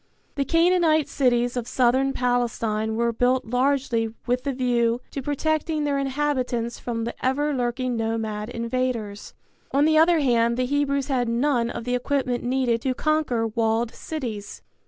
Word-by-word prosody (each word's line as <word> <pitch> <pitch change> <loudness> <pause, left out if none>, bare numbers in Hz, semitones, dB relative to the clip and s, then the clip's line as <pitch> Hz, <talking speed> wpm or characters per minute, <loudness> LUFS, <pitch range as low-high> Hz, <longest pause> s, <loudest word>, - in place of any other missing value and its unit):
The 280 -1 -1
Canaanite 330 -1 +3
cities 245 -2 +1
of 245 -2 -3
Southern 260 +2 +2
Palestine 230 -4 -1
were 235 +1 +1
built 250 +3 +1
largely 250 -2 0
with 250 +2 -1
the 280 - 0
view 240 -2 +1
to 275 - -4
protecting 310 +2 -1
their 285 -1 0
inhabitants 260 -4 -1
from 230 -2 -3
the 235 - -3
ever 290 +3 +1
lurking 250 -1 -1
nomad 225 -1 -2
invaders. 235 -3 -3 0.4
On 280 +2 +3
the 315 0 +4
other 335 +1 +5
hand 235 -4 +2
the 255 - +1
Hebrews 280 0 0
had 250 -3 0
none 240 0 +1
of 235 - -5
the 245 +1 -2
equipment 250 -1 -1
needed 245 -2 0
to 260 0 -1
conquer 305 -6 0
walled 225 +1 0
cities. 230 -10 -6
250 Hz, 155 wpm, -24 LUFS, 235-280 Hz, 0.4 s, other